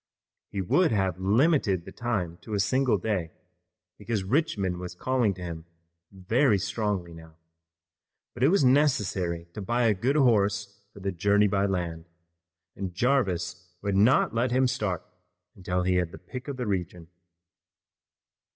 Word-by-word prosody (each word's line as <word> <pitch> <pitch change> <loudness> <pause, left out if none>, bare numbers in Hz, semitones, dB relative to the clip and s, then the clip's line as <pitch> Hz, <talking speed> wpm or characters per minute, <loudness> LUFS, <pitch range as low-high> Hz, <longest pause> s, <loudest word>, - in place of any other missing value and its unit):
He 100 - -3
would 165 - +2
have 95 -4 0
limited 105 - +2
the - - -9
time 105 -9 -3
to 110 - -5
a - - 0
single 125 +3 +2
day, 95 -4 -2 0.7
because 105 -1 -2
Richmond 100 - 0
was 90 0 -7
calling 120 -2 0
to 90 - -9
him 85 -2 -6 0.5
very 105 +5 +2
strongly 100 -3 -2
now, 80 -1 -13 1.0
but 120 - -10
it 130 - +6
was 180 -1 +3
necessary 105 - +2
to 105 - -6
buy 120 +5 0
a 110 -2 +4
good 125 +9 0
horse 105 -6 +2
for 100 - -13
the 95 +1 -1
journey 100 +3 +3
by 100 0 +1
land, 85 -4 -3 0.7
and 95 -3 -5
Jarvis 90 -7 -1
would 100 -1 0
not 110 +6 +4
let 120 +2 +1
him 130 +2 +2
start 105 -9 -2 0.5
until 90 -1 -2
he 90 0 +2
had 90 -2 0
the - - -10
pick 130 +1 -9
of 140 -2 -5
the 125 - -3
region. 90 -4 -3
100 Hz, 155 wpm, -27 LUFS, 90-120 Hz, 1.0 s, it